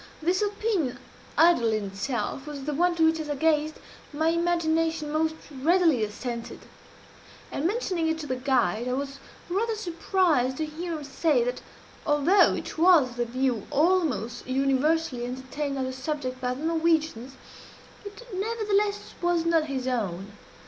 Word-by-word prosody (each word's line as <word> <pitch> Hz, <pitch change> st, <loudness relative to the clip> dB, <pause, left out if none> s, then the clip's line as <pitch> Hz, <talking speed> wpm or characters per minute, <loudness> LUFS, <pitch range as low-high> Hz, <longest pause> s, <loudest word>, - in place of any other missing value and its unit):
This 355 Hz, +5 st, +1 dB
opinion, 410 Hz, -, -1 dB, 0.4 s
idle 325 Hz, -9 st, +5 dB
in 215 Hz, -1 st, 0 dB
itself, 215 Hz, +7 st, -3 dB
was 290 Hz, -2 st, -6 dB
the 300 Hz, +2 st, -2 dB
one 350 Hz, +4 st, +2 dB
to 325 Hz, -1 st, +3 dB
which, 320 Hz, 0 st, +3 dB
as 310 Hz, -1 st, -5 dB
I 290 Hz, -, -1 dB
gazed, 310 Hz, +1 st, +1 dB, 0.4 s
my 315 Hz, +2 st, +1 dB
imagination 330 Hz, -2 st, +1 dB
most 315 Hz, +1 st, +1 dB, 0.2 s
readily 310 Hz, -2 st, +3 dB
assented; 235 Hz, +3 st, -5 dB, 0.9 s
and, 300 Hz, -, 0 dB
mentioning 370 Hz, -6 st, -1 dB
it 320 Hz, 0 st, 0 dB
to -, -, -6 dB
the 260 Hz, -3 st, -2 dB
guide, 250 Hz, -3 st, +1 dB
I 250 Hz, -, 0 dB
was 275 Hz, +1 st, -4 dB, 0.3 s
rather 435 Hz, +5 st, 0 dB
surprised 335 Hz, -, +1 dB
to 315 Hz, -, -1 dB
hear 330 Hz, +3 st, -5 dB
him 300 Hz, -, -8 dB
say 280 Hz, -2 st, +1 dB
that, 245 Hz, +1 st, -3 dB, 0.4 s
although 295 Hz, +7 st, +4 dB
it -, -, -6 dB
was 325 Hz, -7 st, +6 dB
the 240 Hz, 0 st, -1 dB
view 245 Hz, -2 st, -1 dB
almost 300 Hz, -9 st, +1 dB
universally 275 Hz, +1 st, +1 dB
entertained 265 Hz, +3 st, -4 dB
of 265 Hz, -, -1 dB
the 260 Hz, -, -4 dB
subject 260 Hz, -1 st, -4 dB
by 250 Hz, 0 st, -1 dB
the 290 Hz, +5 st, -5 dB
Norwegians, 320 Hz, -6 st, 0 dB, 0.7 s
it 415 Hz, +4 st, -10 dB
nevertheless 410 Hz, 0 st, -1 dB
was 345 Hz, -1 st, +1 dB
not 330 Hz, -2 st, +3 dB
his 265 Hz, -3 st, -3 dB
own. 200 Hz, -6 st, -2 dB
300 Hz, 155 wpm, -26 LUFS, 255-335 Hz, 0.9 s, was